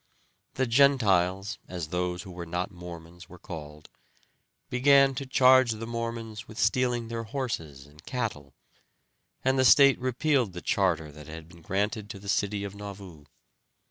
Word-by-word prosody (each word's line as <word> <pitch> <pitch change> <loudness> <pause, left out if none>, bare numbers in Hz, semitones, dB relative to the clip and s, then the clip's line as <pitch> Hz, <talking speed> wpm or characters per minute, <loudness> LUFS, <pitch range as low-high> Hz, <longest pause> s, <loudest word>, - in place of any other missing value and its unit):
The 130 - +1
Gentiles, 105 -7 +3
as 85 -4 -5
those 90 0 -2
who 95 - -10
were 85 -1 -7
not 90 +4 -3
Mormons 85 -1 -11
were 90 - -12
called, 75 -3 -9 0.8
began 140 +2 +5
to 135 +1 -5
charge 130 -2 +5
the 110 +1 -6
Mormons 115 -1 -5
with 110 - -12
stealing 120 -2 +1
their 115 0 -4
horses 90 - -4
and 75 +2 -18
cattle, 105 - -4 0.9
and 130 0 +2
the - - +4
state 140 +1 +7
repealed 130 - +1
the 90 - -7
charter 90 - 0
that 75 0 -13
had 80 0 -9
been 85 0 -16
granted 105 +4 -2
to 115 - -7
the 100 0 -9
city 100 0 0
of 100 -1 -5
Nauvoo. 100 -6 -10
100 Hz, 155 wpm, -28 LUFS, 85-125 Hz, 0.9 s, state